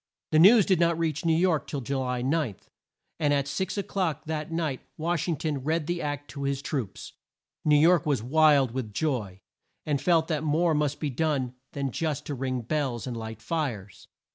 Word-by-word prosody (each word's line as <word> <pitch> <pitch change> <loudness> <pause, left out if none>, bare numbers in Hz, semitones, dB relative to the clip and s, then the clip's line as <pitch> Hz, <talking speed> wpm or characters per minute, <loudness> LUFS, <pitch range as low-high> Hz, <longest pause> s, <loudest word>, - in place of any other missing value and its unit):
The 155 - +4
news 205 +4 +8
did 185 -4 +2
not 170 -1 +3
reach 160 -2 -1
New 165 -1 +4
York 170 -2 +2
till 140 - -4
Ju 135 +2 -2
ly 125 -1 -2
9, 140 -5 0 0.6
and 150 -2 +2
at 140 -1 0
six 190 +7 -2
o'clock 185 -6 -2
that 155 0 -4
night 160 -5 -2 0.2
Wash 170 +1 -1
ing 165 -3 0
ton 145 -3 -2
read 155 +2 0
the 175 +2 -2
Act 145 0 -4
to 140 - -7
his 140 0 -2
troops. 130 -11 -4 0.5
New 150 -1 +5
York 165 +2 +5
was 135 -7 +1
wild 145 -1 +4
with 115 -5 -5
joy, 110 -12 -2 0.4
and 145 -3 0
felt 165 -2 +3
that 155 -2 -1
more 160 +2 +2
must 150 -1 0
be 150 -3 -2
done 135 -3 -1 0.2
than 140 -2 -2
just 155 +1 -2
to 145 - -4
ring 130 -1 -2
bells 130 -2 -2
and 125 -2 -4
light 110 0 -7
fires. 115 - -4
150 Hz, 195 wpm, -27 LUFS, 130-160 Hz, 0.6 s, news